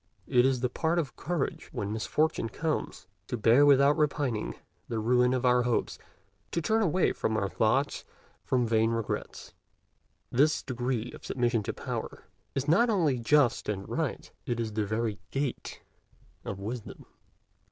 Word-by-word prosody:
It 125 Hz, -1 st, +4 dB
is 130 Hz, -2 st, 0 dB
the 125 Hz, -, +2 dB
part 160 Hz, +6 st, 0 dB
of 160 Hz, -5 st, -2 dB
courage, 170 Hz, -3 st, -3 dB
when 100 Hz, +1 st, -3 dB
misfortune 130 Hz, +3 st, 0 dB
comes, 160 Hz, +4 st, -3 dB, 0.2 s
to 125 Hz, -, -3 dB
bear 120 Hz, +6 st, +5 dB
without 140 Hz, +1 st, +6 dB
repining 145 Hz, -7 st, -1 dB, 0.3 s
the 115 Hz, -, -3 dB
ruin 125 Hz, +3 st, +3 dB
of 130 Hz, 0 st, 0 dB
our 125 Hz, 0 st, +5 dB
hopes, 120 Hz, -1 st, -1 dB, 0.5 s
to -, -, +1 dB
turn 220 Hz, +7 st, +1 dB
away 185 Hz, -2 st, +2 dB
our 110 Hz, -3 st, +1 dB
thoughts 130 Hz, +9 st, +1 dB, 0.4 s
from 125 Hz, -2 st, +1 dB
vain 110 Hz, 0 st, +2 dB
regrets. 115 Hz, -2 st, -4 dB, 0.8 s
This 145 Hz, +5 st, +3 dB
degree 125 Hz, -2 st, -2 dB
of -, -, -12 dB
submission 120 Hz, -3 st, 0 dB
to 100 Hz, -, -4 dB
Power -, -, -5 dB, 0.3 s
is 135 Hz, +1 st, -1 dB
not 195 Hz, +10 st, +4 dB
only 160 Hz, -, +2 dB
just 130 Hz, -1 st, +2 dB
and 100 Hz, -2 st, -3 dB
right: -, -, -3 dB, 0.2 s
it 120 Hz, -1 st, -1 dB
is 110 Hz, -2 st, -2 dB
the 105 Hz, -1 st, -1 dB
very 110 Hz, -1 st, -1 dB
gate 135 Hz, -2 st, -4 dB, 0.6 s
of 100 Hz, -, -5 dB
wisdom. 110 Hz, +3 st, -6 dB
125 Hz, 150 wpm, -29 LUFS, 115-145 Hz, 0.8 s, without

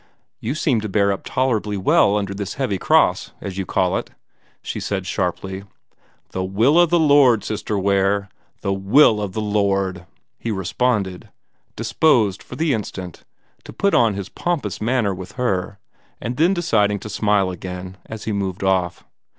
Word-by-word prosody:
"You 125 Hz, +6 st, -3 dB
seem 135 Hz, -8 st, +1 dB
to 110 Hz, -, -4 dB
bear 100 Hz, 0 st, +2 dB
up 100 Hz, -, -3 dB
tolerably 110 Hz, -5 st, 0 dB
well 100 Hz, +2 st, +3 dB
under 100 Hz, -1 st, -2 dB
this 100 Hz, 0 st, -5 dB
heavy 125 Hz, -9 st, -1 dB
cross, -, -, +2 dB
as 95 Hz, -1 st, -6 dB
you 95 Hz, -, -3 dB
call 90 Hz, -1 st, +1 dB
it," -, -, -9 dB, 0.5 s
she -, -, -4 dB
said 95 Hz, -2 st, -3 dB
sharply. 95 Hz, +1 st, -3 dB, 0.7 s
"The 95 Hz, -, -2 dB
will 110 Hz, -, +3 dB
o' 175 Hz, -, +6 dB
the 175 Hz, +2 st, +3 dB
Lord, 140 Hz, -8 st, +5 dB
Sister 105 Hz, 0 st, -3 dB
Ware 100 Hz, +1 st, +1 dB, 0.3 s
the 100 Hz, -, 0 dB
will 105 Hz, +3 st, +4 dB
o' 105 Hz, -, -1 dB
the 95 Hz, +3 st, -5 dB
Lord!" 100 Hz, -4 st, 0 dB, 0.3 s
he 115 Hz, -, -4 dB
responded, 100 Hz, -1 st, -1 dB, 0.5 s
disposed 115 Hz, -, +2 dB
for -, -, -10 dB
the 160 Hz, -3 st, +1 dB
instant 95 Hz, -, -6 dB, 0.4 s
to -, -, -10 dB
put 200 Hz, 0 st, 0 dB
on 115 Hz, -4 st, +4 dB
his 100 Hz, -1 st, -5 dB
pompous 150 Hz, -, -3 dB
manner 115 Hz, -3 st, +1 dB
with 90 Hz, 0 st, -9 dB
her, 100 Hz, -6 st, -1 dB, 0.4 s
and 120 Hz, +1 st, -4 dB
then 170 Hz, +7 st, +3 dB
deciding 105 Hz, -, +2 dB
to -, -, -7 dB
smile 105 Hz, -2 st, +1 dB
again 90 Hz, +1 st, -7 dB
as 110 Hz, -1 st, -7 dB
he 110 Hz, -, -3 dB
moved 100 Hz, -2 st, -3 dB
off. 90 Hz, -2 st, 0 dB
100 Hz, 165 wpm, -21 LUFS, 95-115 Hz, 0.7 s, o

